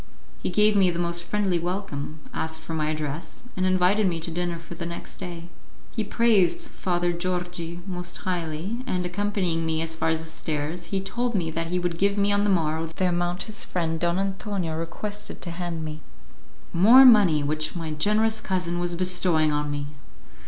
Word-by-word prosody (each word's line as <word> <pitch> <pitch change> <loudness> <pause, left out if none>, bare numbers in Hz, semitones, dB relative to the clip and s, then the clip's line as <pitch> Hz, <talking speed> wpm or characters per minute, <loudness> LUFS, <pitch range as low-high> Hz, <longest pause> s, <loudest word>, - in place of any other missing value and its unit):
He - - -1
gave 210 +3 +4
me 190 -2 +5
the 170 - -2
most 170 0 -1
friendly 190 -1 0
welcome, 165 -4 -4
asked 160 0 -2
for 165 - -6
my 155 -1 0
address, 155 0 -4
and 185 0 +1
invited 185 +3 +3
me 170 -2 -1
to 165 - -4
dinner 175 0 -2
for 170 +1 -10
the 170 0 -5
next 170 - -7
day. 170 -1 -7 0.4
He 220 - -1
praised 230 - +3
Father 175 -1 0
Georgi 175 -1 -3
most 180 -2 -4
highly, 180 +3 -3
and, 180 -4 -1
accompanying 180 -3 0
me 160 -1 0
as 165 0 -2
far 160 - 0
as 160 0 +1
the 160 - -8
stairs, 160 +1 -3
he 190 +3 -1
told 240 +5 -2
me 165 -4 0
that 165 +1 -2
he 180 +2 -1
would 175 -2 -2
give 200 +1 +2
me 200 0 +3
on 205 0 +3
the - - +2
morrow 160 -3 +1
the 175 +3 -1
amount 175 +1 -1
his 215 -2 -2
friend 165 -2 -2
Don 170 +1 +1
Antonio 195 -3 -2
requested 205 +6 -5
him - - -22
to 170 - -4
hand 170 -2 -4
me. 155 0 -6 0.7
More 230 +10 +8
money 200 - +7
which 155 +2 0
my 165 -2 -4
generous 215 +7 +2
cousin 180 -3 -1
was 175 0 0
bestowing 180 -3 +2
on 150 0 -1
me! 145 0 -3
175 Hz, 195 wpm, -25 LUFS, 165-195 Hz, 0.7 s, More